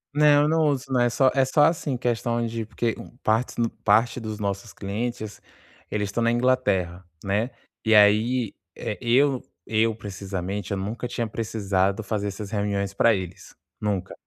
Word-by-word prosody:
Não, 145 -1 +6
eu - - +2
não 160 0 +3
uso 135 -2 -1
não, 125 - +3
é 120 - +4
só 130 +2 +3
é 135 - +3
só 140 +3 +3
assim, 150 -4 +1
questão 120 -1 0
de 115 -1 -3
porque, 115 0 -1
hum, 120 - -12
partes 110 +3 +1
no 115 -1 +2
parte 115 +3 +2
dos 110 -2 -5
nossos 100 +1 -3
clientes, 110 +1 -4 0.5
eles 105 -1 -2
estão 110 +4 -2
na 115 0 +3
Inglaterra, 120 -8 +1 0.2
né. 105 +5 0 0.3
E 110 -1 +4
aí, 110 +3 +4 0.2
eh, 105 - -4
eu 130 +2 +3 0.2
eu, 110 0 +1
precisamente, 100 -1 -5
eu 100 - 0
nunca 105 +6 -4
tinha 120 - -2
precisado 100 -2 -1
fazer 105 -1 -2
essas 100 +1 -6
reuniões 100 -2 -1
para 115 +3 +4
eles. 95 -1 -7 0.2
Nunca. 100 -3 -2
110 Hz, 170 wpm, -25 LUFS, 100-120 Hz, 0.5 s, Não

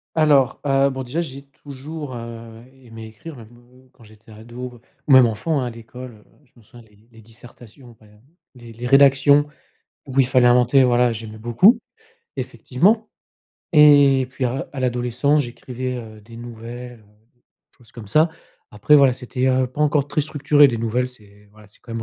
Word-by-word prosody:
Alors, 145 -5 +2
heu, 135 0 +2
bon, 130 0 -6
déjà, 140 +7 -4
j'ai 140 -4 -7 0.2
toujours, 145 0 -9
heu, 115 0 -10 0.2
aimé 115 -2 -12
écrire 125 +9 -12
même, 120 0 -15
heu, 125 +2 -24
quand 115 - -21
j'étais 110 +1 -19
ado 120 +3 -10 0.3
ou 145 - +2
même 130 -2 +7
enfant, 135 +7 -2
hein. 125 - -3
À - - -4
l'école, 120 +2 -11
heu, 105 - -21 0.2
je - - -37
m'en 120 - -20
souviens 115 +2 -18
les 105 +2 -27
les 115 - -17
dissertations, 120 +1 -17
hem, 105 -1 -22 0.3
les 120 -2 -14
les 120 +2 -8
rédactions 140 +2 +4 0.6
où 135 0 -2
il 135 - +5
fallait 125 -2 +3
inventer. 125 +2 +4
Voilà, 125 -1 +2
j'aimais 110 -1 -9
beaucoup, 120 - +3 0.6
effectivement 210 - -1 0.7
et 145 -3 +5
puis, 130 0 -5
à 130 +2 -3
à 140 - -7
l'adolescence, 125 +4 0
j'écrivais, 125 0 -6
heu, 110 -3 -10
des 115 +2 -15
nouvelles, 120 +1 -10
heu, - - -25 0.3
des 120 - -41 0.4
choses, 120 -4 -23
comme 115 -4 -11
ça, 155 +11 +2 0.4
après, 105 +8 +2
voilà, 140 -3 +4
c'était, 125 +1 -4
heu, 130 0 +1
pas 130 +4 -9
encore 145 -1 +1
très 150 - -1
structuré, 145 -1 +3
des 120 -3 -4
nouvelles, 120 +3 -2
c'est 105 -4 -20
voilà, 105 -1 -18
c'est 100 - -22
quand 115 - -12
même 115 0 -5
125 Hz, 185 wpm, -20 LUFS, 115-135 Hz, 0.7 s, même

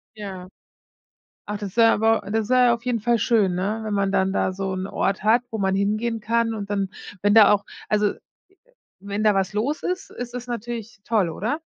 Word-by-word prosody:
Ja, 190 -3 -7 1.0
ach 210 0 -4
das 205 0 -7
wäre 225 -1 +6
aber 225 +1 +2
das 220 0 -1
wäre 255 -1 +5
ja 240 - +4
auf 235 +1 -9
jeden 245 -2 0
Fall 235 +2 +2
schön, 210 -5 +2
ne, 200 +5 -2
wenn 215 - -2
man 195 -1 +1
dann 190 0 +2
da 185 - 0
so 190 0 -3
'nen 185 0 -3
Ort 195 -1 -1
hat, 225 +4 +4
wo 220 - -4
man 190 -1 +1
hingehen 215 +3 0
kann 230 +1 0
und 200 -2 -5
dann 200 -1 -1 0.3
wenn 205 +1 +3
da 215 -2 +8
auch 205 -1 +1 0.2
also, 210 -1 +2 0.9
wenn 200 +2 -4
da 210 - +5
was 195 0 0
los 260 +9 -1
ist, 365 +2 -3
ist 245 -1 -7
es 250 0 -6
natürlich 230 -2 -6
toll, 205 -7 +1
oder? 225 - -2
210 Hz, 210 wpm, -23 LUFS, 200-230 Hz, 1.0 s, da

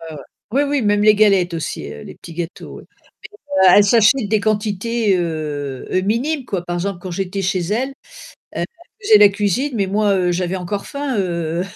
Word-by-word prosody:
Ouais 160 -1 -9
ouais. 140 - -9 0.3
Oui, 275 +6 +2
oui, 285 0 0
même 205 -1 +2
les 215 0 +6
galettes 195 -4 +3
aussi, 165 - -4
heu, 75 - -10
les - - -10
petits 170 - -12
gâteaux, 170 +1 -7
oui. - - -13 0.8
E - - +7
elle 200 +3 +7
s'achète 225 +2 +3
des 215 - +2
quantités, 215 0 0
heu 150 -5 -4
heu, 185 - +1
minimes 255 +8 -1
quoi. 190 -6 -3
Par 175 0 -3
exemple, 190 0 -3
quand 185 - -7
j'étais 195 +2 -3
chez 185 0 0
elle, 250 +5 0
heu, - - -13 0.6
elle - - -3 0.4
faisait 220 - +6
la 205 -1 +8
cuisine, 205 +8 -1
mais 200 -4 0
moi, 205 +1 +1
heu, 180 -1 +1
j'avais 180 +1 -2
encore 195 +3 -4
faim, 280 -5 -3
heu, 170 -2 -2
200 Hz, 205 wpm, -19 LUFS, 175-215 Hz, 0.8 s, la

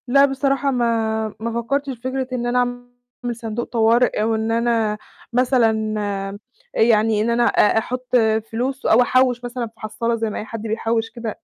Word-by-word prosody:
لا 275 +3 +6
بصراحة 275 0 0
ما 225 -3 0
ما 230 +1 -2
فكرتش 275 +4 -1
في 235 - -15
فكرة 260 0 -2
إن 240 -1 -2
أنا 245 +1 +1
أعمل 245 0 -5
صندوق 230 0 -4
طوارئ 230 0 +2
أو 225 +1 +1
إن 220 +1 -1
أنا 230 -2 +1 0.4
مثلًا 230 -4 +2
آآ، 195 -1 -3 0.4
يعني 220 -1 +3
إن 225 - 0
أنا 235 +1 +2
أ 210 - +3
أحط 250 +3 -2 0.4
فلوس 255 +4 -3
أو 225 - +5
أحوّش 250 0 +2
مثلًا 245 0 -4
في 220 - -18
حصالة 215 +2 -2
زي 225 -1 -2
ما - - -4
أي - - -6
حد 225 -1 -7
بيحوِّش 225 +1 -1
كده. 230 -3 -6
235 Hz, 180 wpm, -21 LUFS, 220-245 Hz, 0.4 s, لا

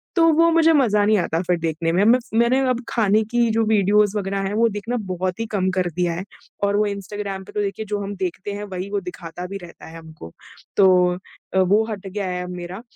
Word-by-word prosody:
तो 330 -2 +5
वो 335 +2 +4
मुझे 330 0 +5
मज़ा 220 -8 +3
नहीं 215 0 +4
आता 165 -1 -1
फिर 180 -1 +2
देखने 165 0 -1
में। 180 +4 +2
मैं 245 +3 +5
फ 240 - -18
मैंने 235 +3 +3
अब 250 0 -1
खाने 215 -1 +2
की 240 -1 +2
जो 225 +1 +2
वीडियोज़ 210 0 +3
वग़ैरह 195 0 -2
हैं, 195 - -3
वो 230 +2 +3
देखना 215 +4 -3
बहुत 185 +1 -3
ही 225 - -1
कम 190 -3 +1
कर 180 -1 +1
दिया 175 -1 0
है 175 +3 -4 0.4
और 200 0 +2
वो 210 - +3
इंस्टाग्राम 200 -1 -5
पे - - -13
तो 210 - -1
देखिए 205 +2 -3
जो 205 0 -2
हम 200 +1 -5
देखते 185 +1 -4
हैं 205 +1 -5
वही 185 +2 -4
वो 205 0 -1
दिखाता 180 -1 -8
भी 200 +2 -6
रहता 170 - -12
है 165 - -10
हमको। 160 - -12 0.5
तो 195 -2 +7 0.7
अ, 190 - +3
वो 195 +4 +4
हट 200 -2 -6
गया 195 0 -3
है 180 0 -3
अब 180 - -7
मेरा। 180 +3 -7
200 Hz, 240 wpm, -22 LUFS, 180-215 Hz, 0.7 s, तो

